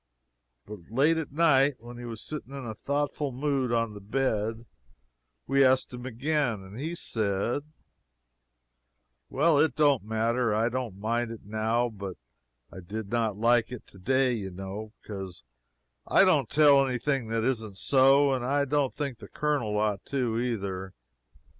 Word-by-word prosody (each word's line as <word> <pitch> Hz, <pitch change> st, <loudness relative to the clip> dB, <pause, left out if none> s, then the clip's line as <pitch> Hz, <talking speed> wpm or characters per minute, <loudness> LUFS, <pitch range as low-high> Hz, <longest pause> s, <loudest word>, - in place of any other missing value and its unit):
But 105 Hz, -1 st, -9 dB
late 145 Hz, +8 st, +3 dB
at 160 Hz, -3 st, -4 dB
night, 145 Hz, -3 st, +4 dB
when 120 Hz, +1 st, -11 dB
he 120 Hz, -, -7 dB
was 115 Hz, -2 st, -7 dB
sitting 140 Hz, -3 st, -7 dB
in 135 Hz, -2 st, -6 dB
a 110 Hz, -, -4 dB
thoughtful 145 Hz, +3 st, -2 dB
mood 135 Hz, -1 st, -1 dB
on 115 Hz, -2 st, 0 dB
the 105 Hz, -, -10 dB
bed, 110 Hz, 0 st, -1 dB, 0.8 s
we 135 Hz, +1 st, +3 dB
asked 130 Hz, -1 st, +3 dB
him 125 Hz, +1 st, -6 dB
again 130 Hz, -3 st, -1 dB
and 95 Hz, +5 st, -10 dB
he 160 Hz, +5 st, -3 dB
said: 110 Hz, -, -1 dB, 1.7 s
"Well, 150 Hz, +2 st, +3 dB
it 150 Hz, -4 st, +3 dB
don't 145 Hz, -5 st, +4 dB
matter; 115 Hz, +1 st, 0 dB
I 115 Hz, +2 st, +2 dB
don't 120 Hz, -5 st, -4 dB
mind 115 Hz, +3 st, -1 dB
it 115 Hz, -3 st, -9 dB
now, 110 Hz, +3 st, 0 dB
but 100 Hz, -4 st, -7 dB, 0.6 s
I -, -, -8 dB
did 100 Hz, +3 st, -6 dB
not 115 Hz, -4 st, 0 dB
like 115 Hz, +1 st, +3 dB
it 125 Hz, -, -8 dB
today, 130 Hz, +7 st, 0 dB
you 100 Hz, -5 st, -4 dB
know, 95 Hz, +4 st, -7 dB
because 95 Hz, -6 st, -7 dB, 0.6 s
I -, -, +6 dB
don't -, -, +3 dB
tell 145 Hz, -2 st, +6 dB
any 130 Hz, -2 st, -1 dB
thing 135 Hz, -1 st, -1 dB
that 115 Hz, 0 st, -1 dB
isn't 110 Hz, -6 st, -2 dB
so, 135 Hz, +2 st, +4 dB
and 130 Hz, -2 st, -2 dB
I 140 Hz, +3 st, +1 dB
don't 140 Hz, -1 st, 0 dB
think 140 Hz, -6 st, -4 dB
the 100 Hz, -, -10 dB
Colonel 140 Hz, -8 st, -1 dB
ought 105 Hz, -1 st, 0 dB
to, 125 Hz, -5 st, -1 dB
either. 95 Hz, -, -3 dB
120 Hz, 160 wpm, -28 LUFS, 110-135 Hz, 1.7 s, I